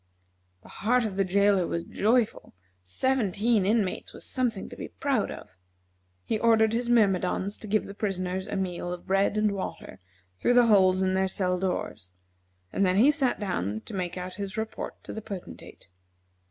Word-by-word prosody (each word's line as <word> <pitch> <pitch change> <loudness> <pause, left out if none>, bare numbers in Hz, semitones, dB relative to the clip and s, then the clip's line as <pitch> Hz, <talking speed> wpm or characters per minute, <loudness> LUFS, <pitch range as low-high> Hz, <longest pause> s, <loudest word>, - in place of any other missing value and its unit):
The - - -15
heart 245 +3 +3
of 205 -3 -3
the 195 - +2
jailer 195 -1 +3
was 170 - -2
joyful; 220 - 0 0.3
seventeen 210 - +1
inmates 210 -3 0
was - - -6
something 245 -6 -1
to - - -9
be - - -6
proud 275 -6 -1
of. - - -9 0.7
He 215 - -1
ordered 220 -1 +4
his 240 +1 -1
myrmidons 200 -3 +2
to 215 - -9
give 215 +1 +1
the 200 - -8
prisoners 190 -2 -2
a - - -4
meal 180 -2 -3
of 180 -1 -7
bread 195 +2 +1
and 215 -1 +2
water 195 -1 -6 0.4
through 245 - +2
the 245 -1 +7
holes 190 -4 +4
in 185 0 +1
their 190 0 +2
cell 180 -1 -1
doors, 105 - -4 0.6
and 200 - +1
then 185 -1 +3
he 245 +9 +6
sat 275 -4 0
down 110 - -2
to - - -11
make 185 -2 -3
out 180 0 -5
his 200 +2 -5
report 220 0 -4
to - - -7
the 220 - -5
Potentate. 200 - -9
200 Hz, 180 wpm, -27 LUFS, 185-220 Hz, 0.7 s, the